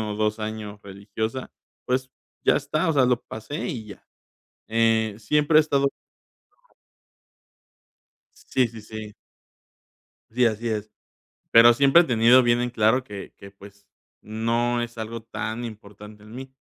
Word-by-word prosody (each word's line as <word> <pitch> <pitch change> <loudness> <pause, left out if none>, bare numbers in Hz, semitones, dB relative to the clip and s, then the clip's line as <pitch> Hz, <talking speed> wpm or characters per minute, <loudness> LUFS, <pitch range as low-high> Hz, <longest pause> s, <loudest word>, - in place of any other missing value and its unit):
o 105 -1 -3
2 110 +1 0
años 110 -1 -6
religiosa, 105 +5 -5 0.3
pues, 130 +1 -1 0.3
ya - - +4
está, 155 +4 -1
o - - +2
sea, 135 -3 +4
lo 125 -1 +1
pasé 125 - -6
y 120 - -5
ya. 100 - -12 0.6
Eh, 110 -2 +1
siempre 150 +7 +2
he - - +8
estado 140 -2 +1 2.6
Sí, 130 -2 +1
sí, 115 0 -11
sí. 110 0 -9 1.2
Sí, 125 +3 +2
así 115 0 0
es. 110 -1 -3 0.6
Pero 115 +1 +8
siempre 140 +6 +6
he - - -3
tenido 120 -1 +5
bien 120 0 +2
en 125 0 -1
claro 115 +3 +2
que 100 -5 -9
que, 100 - -12
pues, 100 0 -16 0.4
no 115 +2 -1
es 120 0 -7
algo 110 +1 -6
tan 115 +1 -5
importante 105 -1 -11
en 110 +2 -13
mí, 130 +1 -9
115 Hz, 145 wpm, -24 LUFS, 110-125 Hz, 2.6 s, he